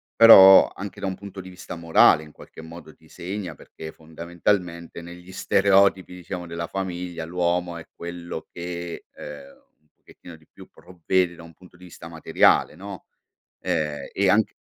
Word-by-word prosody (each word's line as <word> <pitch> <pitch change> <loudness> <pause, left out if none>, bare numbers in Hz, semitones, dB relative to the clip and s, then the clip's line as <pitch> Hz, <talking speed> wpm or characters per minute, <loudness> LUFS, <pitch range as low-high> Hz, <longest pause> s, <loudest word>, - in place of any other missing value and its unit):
però, 95 -4 +9
anche 100 0 -9
da 95 - -2
un 95 - -3
punto 100 -1 -10
di 95 - -12
vista 90 -1 -10
morale, 85 -2 +4
in 75 - -15
qualche - - -14
modo, 80 0 -13
ti - - -24
segna 95 +1 -6
perché, 80 0 -11
fondamentalmente, 85 +2 -4
negli 90 +2 -12
stereotipi, 100 -1 +2
diciamo, 90 0 -7
della 85 0 -5
famiglia, 90 -3 -5
l'uomo 90 0 -2
è 80 - -10
quello 85 -1 -8
che, 85 0 -7
ehm, 75 -2 -11 0.3
un 75 - -37
pochettino 85 -2 -16
di 80 - -26
più - - -16
provvede 90 0 -2
da 85 - -13
un 85 0 -14
punto 90 +2 -20
di 90 - -18
vista 85 -2 -12
materiale, 80 -2 +2
no? 95 +1 -10 0.6
Ehm, 75 -2 -3
e 95 -1 +1
anche 105 +2 +2
85 Hz, 165 wpm, -23 LUFS, 85-95 Hz, 0.6 s, però